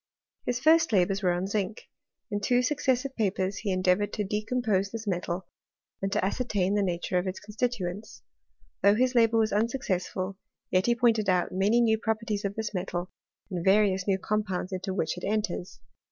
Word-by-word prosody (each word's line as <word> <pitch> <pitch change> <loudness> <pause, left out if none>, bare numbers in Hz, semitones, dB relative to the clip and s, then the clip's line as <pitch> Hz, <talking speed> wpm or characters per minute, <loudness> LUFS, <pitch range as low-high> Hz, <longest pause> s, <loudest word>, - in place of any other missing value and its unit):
His 245 0 0
first 320 +2 +4
labours 195 -1 +2
were 180 -3 +2
on 175 +1 -1
zinc; 200 +1 -3 0.4
in 205 0 -1
two 245 +4 +2
successive 265 -1 0
fSfen 190 -2 0
he 200 -2 -1
endeavoured 185 +2 +2
to 210 - -1
decompose 210 -1 0
this 225 +1 -6
metal, 180 -1 -2 0.6
and 195 0 -1
to 190 - +1
ascertain 200 -3 0
the 205 - +2
nature 180 -1 0
of 180 - -3
its 185 - -4
constituents. 210 -3 -4 0.6
Though 200 +1 +5
liis 255 +2 +2
labour 230 -2 +4
was 220 -1 +2
unsuccessful, 200 -4 -1 0.3
yet 185 +3 +2
he 240 - +4
pointed 225 -4 +2
out 180 -1 +2
many 205 +6 +3
new 220 -2 +3
properties 220 -2 -2
of 200 0 -2
this 220 -1 -3
metal, 180 -1 -3 0.4
and 175 -2 -3
various 195 -1 +3
new 195 -1 +3
com 210 +2 0
pounds 185 -1 -4
into 185 +1 -3
which 180 -2 -1
it - - -16
enters. 205 -3 -2
205 Hz, 180 wpm, -28 LUFS, 185-225 Hz, 0.6 s, Though